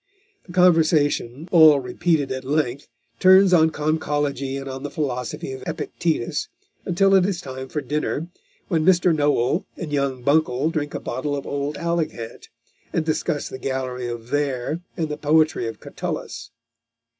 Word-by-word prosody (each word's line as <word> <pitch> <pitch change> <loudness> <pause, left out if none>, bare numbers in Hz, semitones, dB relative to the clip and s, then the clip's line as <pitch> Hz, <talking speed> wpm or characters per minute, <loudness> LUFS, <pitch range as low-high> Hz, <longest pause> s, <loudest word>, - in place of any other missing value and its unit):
The 175 - -10
conversation, 155 -5 +3
all 155 -4 +7
repeated 145 +2 0
at 130 0 -4
length, 140 -1 -1 0.3
turns 190 0 +6
on 160 -2 +6
conchology 145 -3 -1
and 135 0 -6
on 130 0 -6
the 145 - -4
philosophy 135 +1 -3
of 130 - -8
Epictetus 160 -3 -2 0.4
until 195 +2 +3
it 190 -2 +6
is 185 -2 -1
time 130 -4 -7
for 150 - -3
dinner, 150 +2 -2 0.4
when 165 -5 +1
Mr. 175 -1 +4
Noel 145 +1 +1
and 155 -4 -5
young 135 -3 -1
Buncle 145 0 +2
drink 145 -3 -3
a - - -2
bottle 145 +4 -3
of 140 - -5
old 145 +1 -3
Alicant, 165 -9 -3 0.4
and 160 - -1
discuss 155 -1 -1
the 130 - -8
gallery 130 -2 -3
of 120 -1 -5
Verres 140 +2 -1 0.2
and 165 -3 -1
the 150 0 -5
poetry 155 -4 +2
of 115 - -6
Catullus. 115 - -6
150 Hz, 155 wpm, -23 LUFS, 130-160 Hz, 0.4 s, all